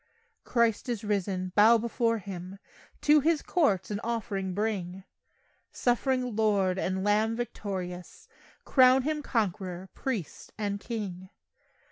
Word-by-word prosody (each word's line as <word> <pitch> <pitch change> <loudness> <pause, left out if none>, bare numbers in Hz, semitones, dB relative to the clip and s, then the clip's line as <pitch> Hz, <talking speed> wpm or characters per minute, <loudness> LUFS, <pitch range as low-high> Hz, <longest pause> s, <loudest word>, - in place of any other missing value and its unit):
Christ 235 0 +1
is 230 -3 -2
risen! 195 -3 -1
Bow 220 +3 +7
before 230 0 0
Him, 190 -2 -7 0.4
To 300 +1 +6
His 315 +1 +1
courts 215 - +1
an 205 - -2
offering 200 -5 -3
bring; 195 -3 -2 0.7
Suffering 250 -1 0
Lord 200 -4 +2
and 190 0 -1
Lamb 215 +2 +2
victorious, 185 -6 -6 0.4
Crown 260 0 +5
Him 305 +1 -1
Conquerer, 190 -7 -2
Priest 225 - -5
and 205 -1 -2
King. 195 -5 -5
210 Hz, 115 wpm, -28 LUFS, 190-235 Hz, 0.7 s, Bow